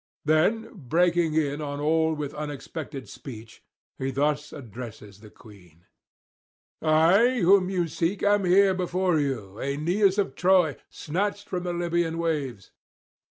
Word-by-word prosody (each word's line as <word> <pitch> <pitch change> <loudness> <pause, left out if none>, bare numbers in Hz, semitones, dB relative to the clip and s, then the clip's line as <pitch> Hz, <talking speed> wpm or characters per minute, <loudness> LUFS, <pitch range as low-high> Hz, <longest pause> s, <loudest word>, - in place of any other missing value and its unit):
[594 205 +9 +1
625]Then 130 -6 -16
breaking 170 -1 +2
in 145 -1 0
on 145 -1 -4
all 160 +1 +2
with 145 -2 -5
unexpected 145 -1 -6
speech 115 -4 -11 0.4
he 130 - -1
thus 145 +2 -1
addresses 110 -5 -10
the 105 0 -14
queen: 90 -8 -18 1.0
'I 180 +11 +4
whom 185 +1 +5
you 180 -3 0
seek 170 +5 -2
am 205 0 +3
here 190 +2 +5
before 180 -2 0
you, 115 -9 -3
Aeneas 175 +9 +1
of 200 -2 0
Troy, 180 -5 +3
snatched 205 +5 -3
from 180 - -3
the 175 0 -3
Libyan 170 -1 -1
waves. 145 - -3
160 Hz, 135 wpm, -26 LUFS, 140-180 Hz, 1.0 s, whom